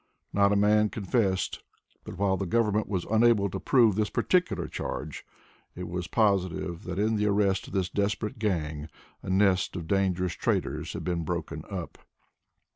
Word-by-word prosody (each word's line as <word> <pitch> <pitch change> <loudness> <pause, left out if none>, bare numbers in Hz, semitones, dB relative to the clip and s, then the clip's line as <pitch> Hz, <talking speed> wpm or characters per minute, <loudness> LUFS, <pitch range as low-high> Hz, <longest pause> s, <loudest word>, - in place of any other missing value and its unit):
Not 100 0 +4
a - - +3
man 105 +1 +4
confessed, 100 -2 -1 0.4
but 90 - -9
while 95 -1 +2
the 95 0 -3
government 105 +1 +1
was 95 -4 -2
unable 110 -3 +4
to 95 - -4
prove 120 -3 +4
this 105 +1 0
particular 180 -1 +1
charge, 75 +2 -5 0.5
it 90 0 -6
was 90 0 -4
positive 95 -5 0
that 90 0 -4
in 110 +2 +1
the 105 0 +1
arrest 100 -2 +1
of - - -11
this 95 -2 +1
desperate 105 +5 -2
gang 80 -7 -2 0.3
a - - -7
nest 95 -1 +2
of 85 -3 -4
dangerous 90 -2 +1
traitors - - -2
had - - -5
been 85 -2 -1
broken 80 -2 -4
up. 90 -4 -6
100 Hz, 165 wpm, -28 LUFS, 90-105 Hz, 0.5 s, Not